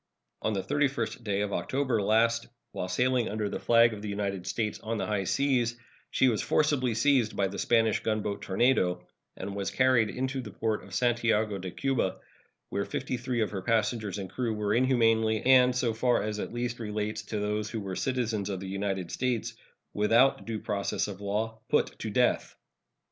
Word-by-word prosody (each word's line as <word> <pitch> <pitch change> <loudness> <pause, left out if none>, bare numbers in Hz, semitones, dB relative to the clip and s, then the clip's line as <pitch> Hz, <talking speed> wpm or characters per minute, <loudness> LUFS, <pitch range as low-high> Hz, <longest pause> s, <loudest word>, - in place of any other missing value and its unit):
On 110 - 0
the 95 -2 -1
31st 140 -3 -1
day 100 -2 0
of 105 -1 -2
October 130 -5 0
last, 115 +3 +2 0.2
while 90 - -4
sailing 125 +5 +1
under 105 -1 -2
the - - -4
flag 115 -1 +5
of 105 - -7
the 105 - -5
United 100 -2 -3
States 110 0 -2
on 115 +1 -3
the - - -1
high 105 -2 -1
seas, 125 0 +1 0.3
she 130 - +3
was 115 -4 +1
forcibly 135 -6 +1
seized 125 -2 +2
by 100 - +1
the 95 +1 -6
Spanish 115 -2 +3
gunboat 105 -2 -2
Tornado, 95 -4 +1 0.3
and 100 +1 -5
was 100 -1 -2
carried 130 -4 +3
into 130 +1 -2
the 115 - -8
port 110 +2 -2
of - - -9
Santiago 115 -4 +1
de 95 0 -5
Cuba, 130 -3 -1 0.5
where 100 +1 -1
fifty 130 -1 -3
three 120 -1 -2
of 110 - 0
her 95 -2 -4
passengers 110 -2 0
and 95 -2 -4
crew 120 -4 -1
were 105 -1 0
inhumanly, 115 -3 +3
and, 125 -1 +6
so 120 -2 +1
far 120 +1 +2
at 105 0 -3
least 120 0 -3
as - - -20
relates 105 -1 -3
to 110 - -5
those 105 0 -1
who 115 - -4
were 95 -2 -5
citizens 115 -6 -1
of 95 -2 -3
the 95 - -6
United 95 -2 -3
States, 125 -3 -1 0.4
without 115 +6 +3
due 115 -1 -2
process 100 -1 -1
of 100 -1 -7
law, 110 +2 -2
put - - +1
to - - -4
death. - - +1
110 Hz, 190 wpm, -29 LUFS, 105-120 Hz, 0.5 s, and